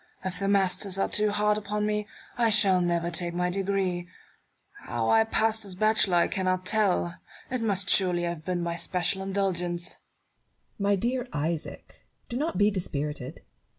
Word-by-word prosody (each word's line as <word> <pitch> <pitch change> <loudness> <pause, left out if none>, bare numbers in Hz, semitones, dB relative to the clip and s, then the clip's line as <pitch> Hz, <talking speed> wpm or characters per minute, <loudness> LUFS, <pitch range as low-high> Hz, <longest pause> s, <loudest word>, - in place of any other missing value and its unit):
If 185 -1 -4
the 195 - -1
masters 195 -1 +1
are 195 - +1
too 210 0 +1
hard 210 0 +1
upon 210 0 -2
me, 210 0 -1 0.3
I 235 -2 +2
shall 200 -4 +5
never 170 -1 0
take 170 0 -1
my 180 0 0
degree. 190 -2 -1 0.8
How 115 -1 0
I 225 0 +6
passed 220 0 +1
as 195 -3 -6
bachelor 215 -2 +3
I 170 - +4
cannot 185 -1 -1
tell: 90 - +1 0.3
it 255 -2 -1
must 200 -4 +1
surely 180 -3 +3
have 170 -2 -3
been 175 +1 -2
by 170 0 -2
especial 180 +2 -1
indulgence. 180 -3 -2 0.8
Barrow. 200 0 0
My 205 - +4
dear 240 +5 -1
Isaac! 155 +2 -4 0.3
do 240 - -3
not 295 - -2
be 205 +2 +4
dispirited. 150 -8 -3
190 Hz, 165 wpm, -27 LUFS, 175-210 Hz, 0.8 s, I